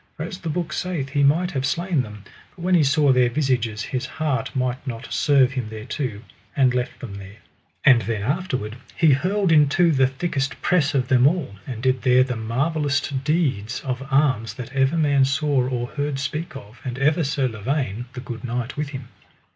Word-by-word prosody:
For 155 - -3
as 180 +3 -6
the 165 - -5
book 160 0 -2
saith 170 -7 -2
he 145 +1 0
might 165 +6 +3
have 135 -2 -2
slain 165 +3 0
them, 105 -3 -9 0.3
but 170 - -10
when 185 +1 +1
he 170 -4 +5
saw 145 0 +4
their 125 -1 +4
visages 120 -5 0
his 130 0 -3
heart 140 -5 -2
might 130 +2 -2
not 120 0 -5
serve 135 -3 +4
him 125 -5 -4
thereto, 110 +1 -5 0.3
but 130 -2 +4
left 125 0 -2
them 115 -6 -7
there. 100 +1 -11 0.5
And 125 -4 +7
then 110 -3 -3
afterward 130 - -2 0.2
he 160 -3 +4
hurled 185 +7 +1
into 155 +3 +4
the 135 -3 +4
thickest 135 0 -2
press 160 -6 +2
of 130 -2 +1
them 130 -1 +5
all, 145 - -1
and 120 -3 -6
did 130 -1 +2
there 130 -1 +5
the 130 -1 -3
marvelloust 140 +4 -1
deeds 135 - 0
of 130 -1 -3
arms 135 -5 +1
that 125 0 -8
ever 135 +4 +2
man 145 -3 +3
saw 140 -1 +1
or 120 -2 -2
heard 145 -2 -2
speak 155 +3 -4
of, 120 -1 -11
and 125 -1 -4
ever 150 +5 +2
Sir 135 -2 0
Lavaine, 120 0 -2
the 125 - -6
good 120 -3 -7
knight, 125 0 -3
with 150 -1 -2
him. 130 -4 -7
135 Hz, 195 wpm, -23 LUFS, 125-150 Hz, 0.5 s, And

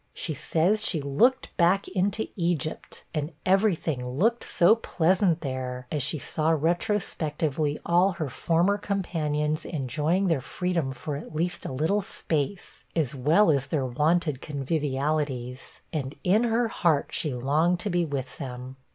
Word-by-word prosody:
She 160 - -1
says 175 +9 +1
she 170 - +3
'looked 150 - +2
back 185 +3 +3
into 200 +3 0
Egypt,' 170 -4 -2
and 155 +1 -3
every 195 +1 +4
thing 145 -6 -3
looked 190 - +1
'so 195 +6 +4
pleasant 180 -3 +1
there,' 130 -3 -4
as 150 - -1
she 145 +4 -1
saw 155 +3 -1
retrospectively 160 -3 0
all 180 +3 +3
her 160 -5 -3
former 170 - +1
companions 155 -7 -1
enjoying 155 +6 0
their 165 -7 +1
freedom 170 -2 -2
for 140 +3 -5
at 155 +1 -9
least 175 +3 -2
a - - -5
little 160 +10 +1
space, 170 -1 -3
as 150 -6 +1
well 155 +9 +4
as 140 -2 0
their 140 -2 0
wonted 150 +2 +1
convivialities, 140 -3 -2
and 140 -2 -3
in 210 +6 +3
her 235 +1 +2
heart 165 -9 +1
she 150 -5 -1
longed 155 +8 +1
to 205 - -2
be 175 0 +2
with 140 -5 -4
them. 130 -1 -7
160 Hz, 150 wpm, -26 LUFS, 140-180 Hz, -, every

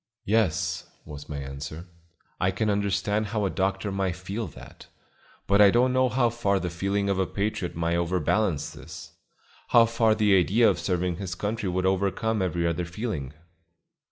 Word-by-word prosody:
"Yes," 105 -6 0 0.2
was 75 -1 -10
my 75 - -4
answer; 70 +4 -7 0.5
"I 95 - +2
can 105 +3 0
understand 100 +1 0
how 105 0 -1
a 95 - 0
doctor 95 +1 -1
might 95 -2 -1
feel 100 +5 -5
that; - - -13 0.6
but 100 +1 +4
I 100 - +8
don't 125 +4 +3
know 130 0 +3
how 120 -2 +2
far 100 -4 0
the 90 -1 -3
feeling 100 +3 -1
of 100 -1 0
a 95 - +1
patriot 100 -3 -3
might 85 +1 0
overbalance 85 -1 0
this; 80 +4 -11 0.6
how 115 -1 +6
far 115 -1 +2
the 105 -2 +4
idea 100 +6 +4
of 95 -6 +2
serving 90 0 -1
his 90 -2 -5
country 105 +1 -2
would 90 +1 -1
overcome 100 +3 0
every 85 -2 0
other 85 +1 -1
feeling." 85 - -4
95 Hz, 170 wpm, -26 LUFS, 85-105 Hz, 0.6 s, I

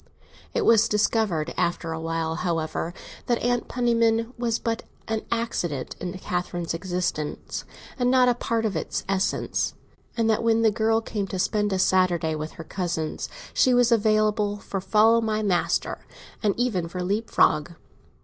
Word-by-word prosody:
It - - +1
was 225 -1 +5
discovered 210 -6 +1
after 170 -1 -1
a 160 - -3
while, 165 0 -2
however, 165 -2 -2 0.4
that 240 - +2
Aunt 245 0 +1
Penniman 230 -1 +1
was 235 -2 0
but 230 0 -2 0.3
an 220 -1 -1
accident 180 - -2
in 180 +1 -4
Catherine's 175 -2 -3
existence, 175 -3 -3 0.3
and 245 0 +3
not 255 -1 +5
a 245 - +5
part 230 -1 -1
of 210 - -1
its - - -2
essence, 195 0 0 0.4
and 230 -1 +2
that 220 -1 +2
when 230 0 +3
the 220 - +5
girl 225 +1 +2
came 210 -3 -3
to 190 - -4
spend 210 +2 +1
a 190 - +1
Saturday 185 -4 +2
with 155 0 -5
her 165 - -8
cousins, 165 -2 -3 0.2
she 255 -1 +4
was 245 -1 +4
available 215 -2 +2
for 195 -1 -5
"follow 220 +4 +4
my 215 -1 -1
master," 185 -4 0 0.4
and 205 -3 +1
even 220 -9 0
for 180 +1 -4
leapfrog. 180 -5 +2
210 Hz, 160 wpm, -25 LUFS, 175-230 Hz, 0.4 s, was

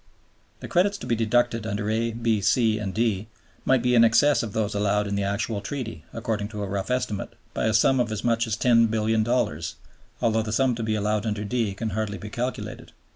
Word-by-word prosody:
The - - -6
credits 195 +2 +2
to - - -8
be 120 - +1
deducted 115 0 +1
under 105 0 -2
(a), 115 +1 0
(b), 115 -2 0
(c), 110 +3 +2
and 100 -2 -3
(d) 110 -1 0 0.4
might 130 -2 +3
be 125 0 +2
in 115 -1 +6
excess 140 +6 +4
of 115 - -4
those 105 -2 -1
allowed 105 0 +1
in 100 - -3
the 100 - 0
actual 100 +1 -2
Treaty, 115 - -6
according 110 -3 -2
to 105 -1 -5
a - - -3
rough 95 +2 -3
estimate, 125 -5 -2 0.2
by - - -1
a 110 - +1
sum 130 +4 +4
of 120 -2 0
as 105 -1 -3
much 115 0 +1
as 110 0 -1
$10,000,000,000, 110 -5 +2 0.5
although 110 -2 +2
the 110 0 -4
sum 130 +3 +2
to 115 - -4
be 110 -1 0
allowed 105 +1 0
under 105 -1 -2
(d) 110 -2 -1
can 110 +2 -3
hardly 105 0 -2
be 105 +4 -8
calculated. 125 +3 -5
110 Hz, 215 wpm, -25 LUFS, 105-120 Hz, 0.5 s, in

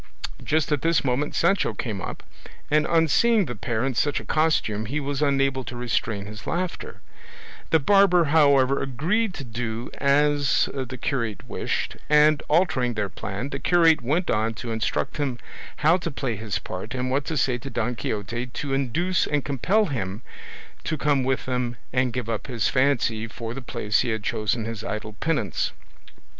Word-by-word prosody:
Just 155 0 +1
at 150 - +1
this 165 0 +2
moment 130 +3 0
Sancho 195 - +2
came 105 -3 -4
up, - - -6 0.5
and 150 0 +3
on 165 -1 +3
seeing 225 - +4
the 125 - -4
pair 110 +4 -2
in 135 - 0
such 145 +4 +1
a - - -10
costume 110 -9 +1
he 145 +6 -1
was 140 0 -3
unable 135 -2 +2
to 125 - -6
restrain 110 -4 -1
his 105 +1 -9
laughter; 180 +1 -3 0.7
the 160 - +5
barber, 180 +2 +5
however, 140 -3 +4
agreed 175 - 0
to - - -6
do 115 0 -4
as 145 0 +3
the 130 -1 -4
curate 115 -5 -2
wished, - - -3
and, 150 0 +5
altering 145 -7 +2
their 105 -2 -1
plan, 100 +7 -5
the 135 - -4
curate 165 0 +4
went 155 +9 0
on 110 +1 0
to 115 +2 -5
instruct 110 +4 -1
him 135 -5 -1 0.4
how 160 +4 +4
to 170 -2 -4
play 135 -5 -3
his 105 -1 -3
part 95 +7 -6
and 130 0 -1
what 140 +2 +1
to 160 - -2
say 125 -2 +1
to 135 +3 -7
Don 125 -2 -1
Quixote 115 +3 -3
to 135 +2 -4
induce 165 +8 +1
and 145 -2 0
compel 180 - +2
him 110 - -4 0.6
to 155 - -2
come 145 -2 +2
with 130 0 0
them 125 -1 -1 0.2
and 125 -1 +2
give 125 -2 -4
up 110 -3 -3
his 120 -5 0
fancy 125 -5 +1
for 115 +1 -6
the 135 - -6
place 105 -3 0
he 125 - 0
had 110 -2 -2
chosen 110 +1 -1
for 110 - -4
his 115 -1 -6
idle 105 0 -4
penance. 115 - -1
130 Hz, 180 wpm, -25 LUFS, 115-150 Hz, 0.7 s, the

